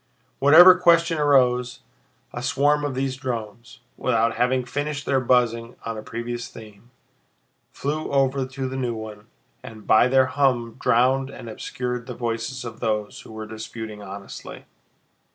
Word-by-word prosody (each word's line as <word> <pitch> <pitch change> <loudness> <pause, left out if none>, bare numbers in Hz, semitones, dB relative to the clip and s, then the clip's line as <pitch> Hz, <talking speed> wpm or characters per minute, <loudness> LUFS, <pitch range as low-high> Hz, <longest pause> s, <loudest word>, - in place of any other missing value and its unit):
Whatever 175 +6 +8
question 170 -2 +3
arose, 125 -4 +2 0.5
a 120 - -5
swarm 145 +3 +1
of 145 -3 -2
these 130 0 -2
drones, 120 0 -6 0.2
without 115 -2 +1
having 125 +1 0
finished 145 +3 -4
their 135 -1 +2
buzzing 120 -2 +1
on 115 0 -3
a 110 - -6
previous 120 +2 -5
theme, 110 +1 -14 0.8
flew 150 +2 -3
over 135 -1 +1
to 130 0 -5
the 130 - -6
new 125 -3 -2
one 110 -1 -9 0.3
and 110 -1 -11
by 110 - +5
their 130 0 +4
hum 130 -4 0
drowned 130 +3 +2
and 130 - -10
obscured 125 +2 -5
the 125 - -6
voices 115 +2 -4
of 115 -1 -8
those 105 -2 -2
who - - -14
were 110 0 -7
disputing 110 -1 -8
honestly. 100 0 -9
125 Hz, 150 wpm, -23 LUFS, 115-135 Hz, 0.8 s, Whatever